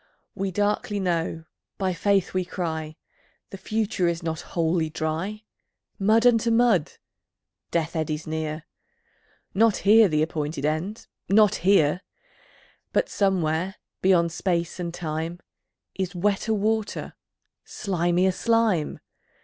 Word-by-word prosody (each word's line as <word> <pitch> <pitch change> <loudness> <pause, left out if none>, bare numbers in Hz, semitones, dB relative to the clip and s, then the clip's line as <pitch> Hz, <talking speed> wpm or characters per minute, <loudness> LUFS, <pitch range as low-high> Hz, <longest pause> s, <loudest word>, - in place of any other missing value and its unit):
We 195 0 -2
darkly 205 +1 0
know, 165 -3 -1 0.3
by 190 -2 0
Faith 200 +1 +1
we 185 0 +1
cry, 160 -3 -4 0.6
The 195 - -7
future 210 -3 -1
is 170 0 -1
not 160 -1 -3
Wholly 165 -1 0
Dry. 165 +8 -3 0.6
Mud 220 +4 +3
unto 235 -1 +4
mud! 225 -8 +3 0.8
Death 165 0 -1
eddies 155 -1 -2
near 155 0 -4 0.9
Not 225 +1 +4
here 215 +1 +7
the 155 -3 +1
appointed 150 -2 -3
End, 160 +8 -2 0.2
not 210 0 +5
here! 180 -3 +3 0.9
But - - +1
somewhere, 185 -2 0 0.3
beyond 175 -3 +3
Space 170 0 -1
and 170 -1 -3
Time, 165 0 -4 0.5
Is 190 -1 -3
wetter 200 +4 0
water, 215 +1 -1 0.5
slimier 180 -1 0
slime! 225 -8 +1
180 Hz, 115 wpm, -25 LUFS, 160-205 Hz, 0.9 s, here